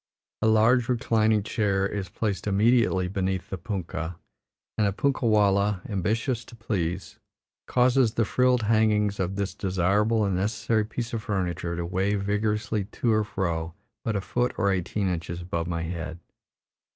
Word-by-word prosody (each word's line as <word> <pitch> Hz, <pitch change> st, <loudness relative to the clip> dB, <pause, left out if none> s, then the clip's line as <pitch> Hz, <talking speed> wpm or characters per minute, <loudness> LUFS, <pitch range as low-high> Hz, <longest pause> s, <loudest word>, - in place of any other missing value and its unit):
A -, -, +3 dB
large 115 Hz, +3 st, +4 dB
reclining 110 Hz, -3 st, +2 dB
chair 100 Hz, -3 st, 0 dB
is 100 Hz, -2 st, -3 dB
placed 105 Hz, +2 st, -2 dB
immediately 105 Hz, -2 st, +3 dB
beneath 95 Hz, -1 st, -2 dB
the 95 Hz, -, -2 dB
punkah, 85 Hz, -4 st, -4 dB, 0.6 s
and 105 Hz, -2 st, +2 dB
a -, -, +1 dB
punkah 130 Hz, +4 st, 0 dB
wallah, 100 Hz, -2 st, +3 dB
ambitious 110 Hz, +5 st, -1 dB
to -, -, -13 dB
please, 95 Hz, -7 st, -3 dB, 0.5 s
causes 125 Hz, -2 st, +3 dB
the 115 Hz, -, +2 dB
frilled 125 Hz, +1 st, +2 dB
hangings 105 Hz, -2 st, +2 dB
of 95 Hz, +1 st, -1 dB
this 100 Hz, -1 st, -2 dB
desirable 100 Hz, +4 st, +1 dB
and 100 Hz, -2 st, 0 dB
necessary 110 Hz, +3 st, 0 dB
piece 115 Hz, +2 st, -5 dB
of 115 Hz, -, -2 dB
furniture 90 Hz, -4 st, -2 dB
to 85 Hz, 0 st, -3 dB
wave 95 Hz, +3 st, 0 dB
vigorously 105 Hz, 0 st, 0 dB
to 110 Hz, +2 st, 0 dB
and 110 Hz, -1 st, +1 dB
fro 85 Hz, -5 st, -2 dB, 0.3 s
but 115 Hz, -, -1 dB
a 100 Hz, -, 0 dB
foot 120 Hz, +6 st, -1 dB
or 100 Hz, -2 st, +2 dB
eighteen 95 Hz, +2 st, -1 dB
inches 85 Hz, -1 st, -3 dB
above 85 Hz, -2 st, -3 dB
my 85 Hz, -1 st, -2 dB
head. 85 Hz, 0 st, -5 dB
105 Hz, 155 wpm, -26 LUFS, 95-110 Hz, 0.6 s, large